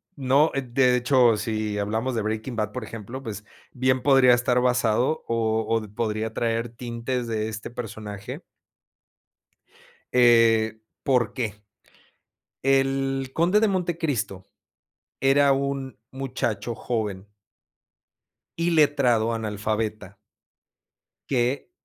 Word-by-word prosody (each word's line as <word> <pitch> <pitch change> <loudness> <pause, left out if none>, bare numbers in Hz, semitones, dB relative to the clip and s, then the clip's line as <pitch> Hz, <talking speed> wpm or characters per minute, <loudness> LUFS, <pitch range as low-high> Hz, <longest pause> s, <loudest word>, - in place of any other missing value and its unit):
¿no? 140 +3 +3
De, 140 - 0
de 125 0 +2
hecho 125 -2 +4
si 110 -2 -2
hablamos 110 +5 -1
de 115 - -1
Breaking 110 +3 -3
Bad, 105 -1 -1
por 125 +1 -5
ejemplo, 115 +4 -8
pues, 105 -3 -6 0.3
bien 130 0 +1
podría 135 -3 +6
estar 125 0 +1
basado, 125 +3 +1
o, 110 -1 0
o 115 0 +1
podría 110 0 -2
traer 115 +1 -1
tintes 120 +1 -4
de 110 -1 -2
este 110 +1 -7
personaje. 105 -4 -7 1.8
Eh, 115 -2 +4 0.2
¿por 125 -5 +1
qué? 115 -5 -3 1.1
El 135 0 +1
Conde 180 +6 +3
de 220 - +3
Montecristo 160 - -2 0.8
era 140 +1 +4
un 135 -3 -3
muchacho 120 -5 -3
joven. 105 -5 -3 1.3
Iletrado 145 -9 +3
analfabeta. 110 -2 -3 1.1
Que 130 - 0
120 Hz, 105 wpm, -25 LUFS, 110-135 Hz, 1.8 s, podría